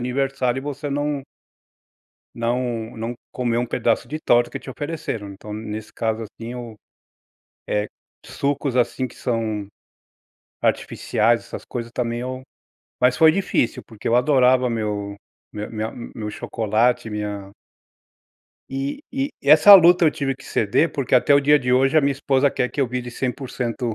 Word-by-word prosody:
aniversário 135 -1 0
e - - -11
você 145 0 -5
não 145 0 -1 1.1
não, 115 -1 -2
não 115 +2 -4 0.2
comer 120 -2 -1
um 120 - 0
pedaço 115 -1 0
de 155 - -4
torta 120 -4 +3
que - - -5
te - - -9
ofereceram, 145 -8 -5
então, 105 +2 -10
nesse 110 0 -6
caso, 115 -1 -2
assim 115 +2 -8
eu, 120 -3 -8 0.9
eh, 105 0 0 0.4
sucos, 140 -2 -2
assim, 125 +1 +1
que - - -16
são 110 -4 -2 0.9
artificiais, 115 +2 +1
essas - - -9
coisas 120 -1 -6
também 120 -1 -2
eu 130 +1 -5 0.6
mas 125 0 +3
foi 160 -1 +7
difícil 170 - 0
porque 110 -3 -7
eu 115 - +3
adorava 130 -1 +4
meu 105 -3 -3 0.4
meu 105 0 -5
minha 110 0 -3 0.2
meu 105 -2 -4
chocolate, 115 +3 0
minha 105 -2 -5 1.2
E 135 - -3
e 275 +1 -2
essa 155 +8 +8
luta 175 -1 +7
eu 155 - +5
tive 140 -4 -2
que 135 - -15
ceder, 115 +10 +1
porque 135 -3 -1
até 135 +3 +5
o 140 - +5
dia 145 +1 +5
de 125 -2 -1
hoje, 135 +4 +3
a - - +7
minha 140 0 +2
esposa 140 0 +2
quer 125 - -1
que - - -13
eu 135 - +3
vire 125 0 -4
100%, 125 -2 -3
125 Hz, 160 wpm, -22 LUFS, 115-140 Hz, 1.2 s, essa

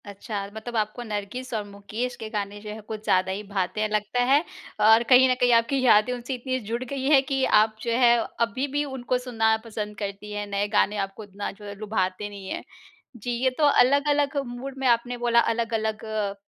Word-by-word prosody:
अच्छा, 200 0 -5
मतलब 235 +2 -7
आपको 215 +3 -2
नरगिस 220 +4 -5
और 215 -2 -1
मुकेश 205 +5 -5
के 220 - -5
गाने 205 -1 -4
जो 210 - -8
है 215 +1 -6
कुछ 215 0 -7
ज़्यादा 185 -2 +2
ही 200 +2 -4
भाते 195 +1 -2
हैं 215 - 0
लगता 210 +3 -1
है 280 +4 +4 0.4
और 220 +2 +6
कहीं 255 +1 +8
न - - +4
कहीं 245 0 +4
आपकी 230 +4 +3
यादें 220 -2 +5
उनसे 245 +2 -5
इतनी 255 +1 -2
जुड़ 230 +2 -4
गई 265 +1 -5
है 280 -3 +7
कि 270 -1 -1
आप 215 -1 +4
जो 235 - -2
है, 240 0 +5 0.2
अभी 235 +4 0
भी 290 +1 -1
उनको 255 -2 -2
सुनना 225 -3 +1
पसंद 210 -2 -5
करती 200 0 -6
हैं, 205 0 -4
नए 200 0 -1
गाने 210 0 +2
आपको 195 +3 -11
इतना 205 0 -6
जो 205 +1 -14
है 205 0 -7
लुभाते 205 -1 -2
नहीं 200 -2 -9
हैं। - - -4 0.5
जी, 240 +2 -5
ये 245 +2 +1
तो 310 - +1
अलग-अलग 285 +1 +3
मूड 255 +3 -7
में 265 -1 0
आपने 245 +1 +2
बोला 240 -1 +3
अलग-अलग 225 -2 -1
प 210 -2 -2
225 Hz, 210 wpm, -25 LUFS, 210-250 Hz, 0.5 s, कहीं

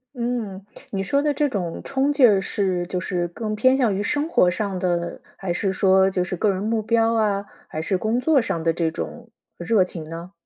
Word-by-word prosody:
嗯， 235 -6 -3 0.3
你 195 -1 -2
说 280 +9 +1
的 295 0 +1
这 295 +1 +1
种 185 -10 -3
冲 275 +1 0
劲 275 -3 +6
儿， 200 -3 +3
是 185 -3 -1
就 180 0 -2
是 175 -1 -2
更 215 +5 -4
偏 260 +4 +4
向 240 -6 +2
于 195 - -1
生 290 +8 0
活 185 - +4
上 195 0 -2
的， 175 -2 -2 0.2
还 185 -3 -2
是 195 +2 0
说 190 0 +4
就 185 -1 0
是 180 - -3
个 205 +4 +1
人 190 +1 -3
目 220 +1 0
标 225 +1 +2
啊， 205 -3 +1 0.2
还 155 - -4
是 185 +4 0
工 220 +6 0
作 280 +1 +3
上 170 -7 -2
的 165 0 +2
这 165 -1 0
种 235 +8 -7 0.3
热 185 +2 +2
情 175 -3 -5
呢？ 165 +3 -8
200 Hz, 235 characters per minute, -23 LUFS, 180-230 Hz, 0.3 s, 劲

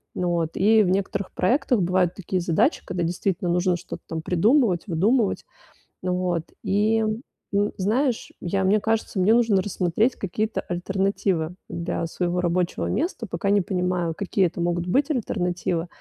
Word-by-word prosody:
Но 180 -1 0
вот, 165 -2 0
и 215 +3 +5
в 180 - +1
некоторых 195 0 -1
проектах 245 +2 +2
бывают 180 0 +1
такие 185 -1 -2
задачи, 170 -2 +2
когда, 175 -1 -2
действительно, 180 +1 -1
нужно 180 +1 +2
что-то - - -8
там 160 -1 -4
придумывать, 200 - +2
выдумывать. 205 +6 +1 0.6
Вот, 180 -2 -1 0.2
и, 215 +3 +2 0.5
м, 205 +1 +2
знаешь, 230 +6 0
я 190 +2 -1
мне 205 +3 +3
кажется, 220 -2 -1
мне 205 +5 +5
нужно 225 -5 +3
рассмотреть 190 +5 0
какие-то 215 +3 -2
альтернативы 180 -2 -1
для 170 0 -3
своего 180 +1 -1
рабочего 180 0 0
места, 310 -8 -2
пока 185 +4 -1
не 205 0 +4
понимаю, 180 -2 -1
какие 195 0 +1
это 175 0 -5
могут 175 0 0
быть 275 - +2
альтернативы. 180 - -1
185 Hz, 150 wpm, -24 LUFS, 175-210 Hz, 0.6 s, и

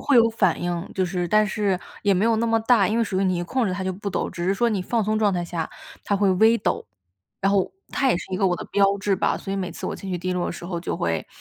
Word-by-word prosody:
会 285 - +5
有 230 -1 +6
反 195 -6 +1
应， 175 0 -3
就 190 - +1
是 175 -1 -2
但 215 +2 +4
是 195 -2 0 0.2
也 200 -2 +3
没 185 - +2
有 230 0 +3
那 230 +1 +1
么 225 0 +3
大， 225 -4 +4
因 220 - 0
为 235 - +2
属 190 -3 -1
于 - - +2
你 185 -1 +1
一 175 - -2
控 245 +7 0
制 185 - -1
它 190 +1 -3
就 185 - -1
不 200 +2 -5
抖， - - -2
只 175 - -5
是 195 - +2
说 235 +4 +2
你 205 -3 0
放 225 +4 0
松 215 +1 +1
状 205 -3 +2
态 175 -1 -1
下 170 -1 -3 0.4
它 200 - +1
会 200 -1 +3
微 220 +5 +5
抖， 200 - -2 0.5
然 195 +1 +2
后 195 -2 +2 0.2
它 275 - +1
也 250 - +3
是 - - -5
一 - - 0
个 195 0 +2
我 180 -1 +1
的 - - -7
标 200 0 +3
志 195 0 +1
吧。 185 - +1
所 195 - -6
以 - - -1
每 185 -2 -3
次 - - -8
我 - - -2
情 195 - -7
绪 180 - -1
低 185 +1 -2
落 180 -1 -1
的 - - -3
时 170 - -9
候 175 -1 -4
就 170 - -3
会 80 -1 -1
195 Hz, 340 characters per minute, -24 LUFS, 180-215 Hz, 0.5 s, 有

